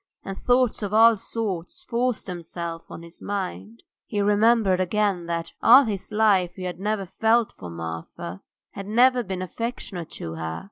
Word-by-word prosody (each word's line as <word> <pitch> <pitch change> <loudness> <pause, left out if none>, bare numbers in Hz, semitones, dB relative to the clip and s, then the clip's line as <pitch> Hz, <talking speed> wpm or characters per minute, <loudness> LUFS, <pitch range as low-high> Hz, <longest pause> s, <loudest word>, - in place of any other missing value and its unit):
And 195 0 -7
thoughts 245 -2 +2
of 205 0 -2
all 225 +1 +7
sorts 205 - -5
forced 245 -5 -1
themselves 170 -1 -6
on 170 - -9
his 170 0 -12
mind. 115 - -5 0.2
He 210 - -2
remembered 205 -1 +3
again 185 -2 0
that 170 -1 -3
all 255 +5 +8
his 205 -2 -4
life 200 -5 +3
he 185 - -7
had 180 -1 -4
never 205 0 -1
felt 225 +4 +2
for 90 - -10
Marfa, 85 +2 -7 0.3
had 195 0 -8
never 250 +3 +4
been 190 -4 -4
affectionate 190 -4 -5
to 80 - -5
her. 80 0 -4
195 Hz, 160 wpm, -24 LUFS, 170-225 Hz, 0.3 s, all